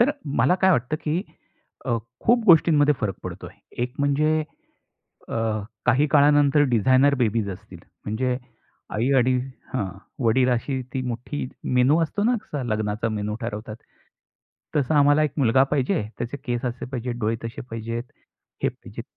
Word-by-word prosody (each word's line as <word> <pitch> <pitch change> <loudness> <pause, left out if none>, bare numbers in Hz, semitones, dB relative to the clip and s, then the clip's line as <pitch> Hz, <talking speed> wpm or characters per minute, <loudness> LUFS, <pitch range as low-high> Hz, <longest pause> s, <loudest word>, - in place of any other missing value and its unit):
तर 250 +5 +5 0.3
मला 135 +10 +4
काय 190 - +6
वाटतं, 140 0 +1
की 160 +4 0 0.6
अ, 115 - +1 0.3
खूप 235 0 +4
गोष्टींमध्ये 150 -3 +6
फरक 100 -5 -1
पडतो - - -7
आहे. - - -15 0.2
एक 125 +1 -3
म्हणजे 150 +2 +2 0.9
अ, - - -4 0.5
काही 130 +5 +4
काळानंतर 145 0 +5
डिझाइनर 130 +6 +4
बेबीज 110 -2 0
असतील. 90 - -10 0.3
म्हणजे 125 +4 -1 0.6
आई 120 +6 +1
आणि 130 +1 +3 0.4
हं, 100 -7 -1 0.4
वडील 125 +3 +3
अशी 130 +2 -1
ती 130 - 0
मोठी 125 +4 -4 0.3
मेनू 140 +6 +4
असतो 205 +6 -1
ना, 245 +1 +3
कसा 145 -9 -5
लग्नाचा 110 0 -1
मेनू 105 -1 -3
ठरवतात. 110 -1 -5 1.0
तसा 145 +1 +2
आम्हाला 145 +2 +5
एक 150 - -1
मुलगा 130 0 +4
पाहिजे. 135 -5 +1 0.2
त्याचे 120 +3 -4
केस 120 -2 -2
असे 120 0 -3
पाहिजेत, 125 -2 -4
डोळे 110 +1 0
तसे 115 - -6
पाहिजेत, 115 +1 -4 0.6
हे - - +4
पाहिजेत. - - -10
130 Hz, 150 wpm, -24 LUFS, 115-145 Hz, 1.0 s, काय